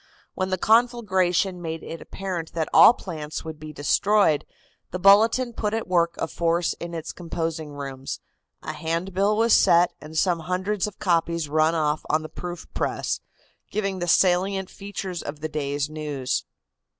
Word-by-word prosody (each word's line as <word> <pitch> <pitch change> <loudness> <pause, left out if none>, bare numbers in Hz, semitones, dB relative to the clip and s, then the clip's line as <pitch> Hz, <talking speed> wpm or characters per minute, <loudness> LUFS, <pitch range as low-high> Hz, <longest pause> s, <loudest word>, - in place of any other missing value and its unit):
When 185 0 -2
the 185 - 0
conflagration 195 -5 +2
made 165 -1 -5
it 165 - -7
apparent 185 -4 -5
that 160 -2 -1
all 240 - +9
plants 155 -5 -6
would 160 -1 -7
be 155 0 -8
destroyed, 155 +3 +2 0.4
the 180 - -4
Bulletin 220 +6 +5
put 210 -1 -1
at 225 - -3
work 170 -2 +2
a - - -2
force 170 +1 0
in 170 0 -6
its 160 - -5
composing 165 -3 -4
rooms, 135 -2 -6 0.4
a - - -4
hand 170 +4 -3
bill 200 +3 +2
was 230 0 +4
set 170 +1 +5
and 155 +1 -8
some 175 0 +2
hundreds 185 +5 -1
of 210 - -9
copies 170 -3 0
run 155 +2 +3
off 155 -1 0
on 155 0 +2
the 155 - -7
proof 175 -1 -7
press, - - -1 0.5
giving 195 -3 -2
the 175 - -2
salient 185 +2 +2
features 195 -3 -6
of 145 +1 -7
the 155 - -3
day's 145 -1 -2
news. 150 -4 -3
170 Hz, 165 wpm, -24 LUFS, 155-195 Hz, 0.5 s, all